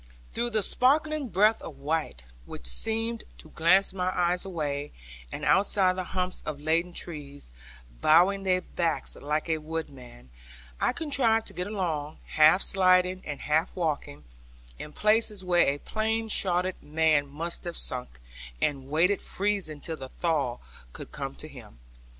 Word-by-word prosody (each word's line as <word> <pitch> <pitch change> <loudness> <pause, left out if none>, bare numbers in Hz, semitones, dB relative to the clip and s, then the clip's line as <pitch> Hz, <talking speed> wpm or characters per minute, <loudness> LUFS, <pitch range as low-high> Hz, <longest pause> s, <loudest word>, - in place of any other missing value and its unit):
Through 240 +1 -1
the 215 -3 +1
sparkling 295 +4 +2
breadth 210 +4 +3
of 150 - -9
white, 145 - -3 0.2
which 60 - -9
seemed 225 - 0
to 155 - -15
glance 185 +4 +4
my 185 -1 -1
eyes 175 0 +2
away, 150 -6 -3 0.4
and - - -5
outside 190 -1 +3
the 185 - -3
humps 185 0 -3
of 150 -2 -5
laden 165 +4 +1
trees, 145 - -6 0.5
bowing 180 +6 +5
their 185 -1 +1
backs 170 -2 -2
like 150 +3 -2
a 160 -1 0
woodman, 140 - -8 0.5
I - - +2
contrived 255 -8 +1
to - - -14
get 180 +1 -3
along, 165 -8 -3
half 155 +5 +5
sliding 185 -1 +3
and 145 -2 -5
half 155 +4 0
walking, 150 - -3 0.6
in 150 - -7
places 215 +1 +2
where 175 -1 +3
a 140 - +1
plain 220 +6 -2
shodden 185 -2 +1
man 155 -1 +2
must 165 +5 -5
have 170 -1 -3
sunk, 125 - -2 0.4
and 135 -2 -1
waited 175 +7 +2
freezing 195 -7 -2
till 160 -2 -4
the 130 -2 -8
thaw 145 -8 -1 0.4
should - - -9
come - - -5
to - - -9
him. - - -13
175 Hz, 150 wpm, -27 LUFS, 150-195 Hz, 0.6 s, bowing